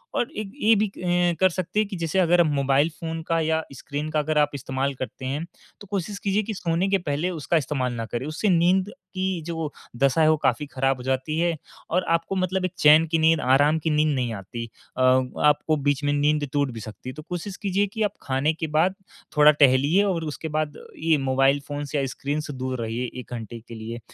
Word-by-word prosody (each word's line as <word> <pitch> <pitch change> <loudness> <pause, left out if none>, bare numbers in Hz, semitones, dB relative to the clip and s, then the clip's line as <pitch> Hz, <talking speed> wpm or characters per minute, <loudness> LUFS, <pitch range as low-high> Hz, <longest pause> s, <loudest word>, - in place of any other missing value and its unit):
और 240 - 0
एक 210 -2 -4
ये 220 +2 +5
भी 210 +1 +2
अ, 175 -2 0
कर 190 - +5
सकते 185 +3 -2
हैं 215 - +2
कि 200 - -6
जैसे 165 +2 0
अगर 175 -1 +5
मोबाइल 140 -1 +2
फ़ोन 165 0 -4
का 165 0 +2
या 160 0 +1
स्क्रीन 145 +3 -5
का 155 0 0
अगर 150 +1 0
आप 150 -1 +4
इस्तेमाल 135 +1 -2
करते 130 0 -6
हैं, 140 +5 -2 0.4
तो 205 - -11
कोशिश 200 +1 -3
कीजिए 200 +2 0
कि 220 - -4
सोने 175 -1 0
के 195 - +3
पहले 160 0 -2
उसका 170 -1 0
इस्तेमाल 130 -4 -1
ना 115 -1 -4
करें। 120 +3 -4
उससे 155 +7 -1
नींद 185 +2 +3 0.2
की 185 -2 -1
जो 165 -3 -3 0.3
दशा 140 +5 +3
है, 155 - +5
वो 155 - +2
काफ़ी 150 0 0
खराब 135 -1 0
हो 125 - -9
जाती 130 +4 -1
है 170 0 +1 0.3
और 180 +2 +1
आपको 165 +3 -3
मतलब 185 0 0
एक 185 - -2
चैन 155 +2 +7
की 165 - +3
नींद 160 0 +4
आराम 145 +5 +4
की 160 - -1
नींद 150 0 +2
नहीं 125 -3 -1
आती। 110 +4 -6 0.3
अ, - - 0
आपको 130 +4 +3
बीच 145 0 +1
में 145 - +2
नींद 145 0 +1
टूट 140 -2 +1
भी 115 - -7
सकती 110 +3 -8
है। - - -6
तो 155 - -9
कोशिश 180 +2 -5
कीजिए 200 0 +1
कि 220 - 0
आप 205 -1 0
खाने 135 +4 0
के 160 0 -4
बाद 185 +4 +2 0.4
थोड़ा 150 0 +8
टहलिए 145 +5 +4
और 185 -5 0
उसके 160 - -6
बाद 155 -2 -2 0.2
ये 160 0 +2
मोबाइल 135 +2 +3
फ़ोन्स 145 0 -5
या 140 -2 +1
स्क्रीन 145 +2 -2
से 145 - -5
दूर 130 -1 -4
रहिए 115 +2 -2
एक 125 - -9
घंटे 115 0 -6
के 115 - -9
लिए, 115 +1 -6
155 Hz, 225 wpm, -24 LUFS, 135-175 Hz, 0.4 s, थोड़ा